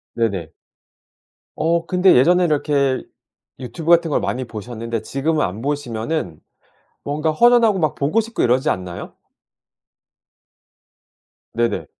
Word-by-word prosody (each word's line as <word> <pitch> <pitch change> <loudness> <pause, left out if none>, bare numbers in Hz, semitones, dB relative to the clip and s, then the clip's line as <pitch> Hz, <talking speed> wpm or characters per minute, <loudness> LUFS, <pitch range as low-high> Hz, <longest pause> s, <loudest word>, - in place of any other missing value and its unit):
네네. 100 -9 -1 1.1
어 165 +1 0
근데 180 +1 +4
예전에 175 +8 +4
이렇게 145 -4 +1 0.6
유튜브 155 +6 -6
같은 170 -2 +4
걸 - - +2
많이 130 +1 -2
보셨는데 115 0 -5
지금은 150 +6 -1
안 100 +5 -6
보시면은 140 - -3 0.7
뭔가 150 +2 -1
허전하고 235 +2 +4
막 155 -4 0
보고 150 +11 +1
싶고 230 +1 -3
이러지 130 +5 +2
않나요? 90 -2 -4 2.4
네네. 120 0 -1
145 Hz, 250 characters per minute, -20 LUFS, 115-165 Hz, 2.4 s, 근데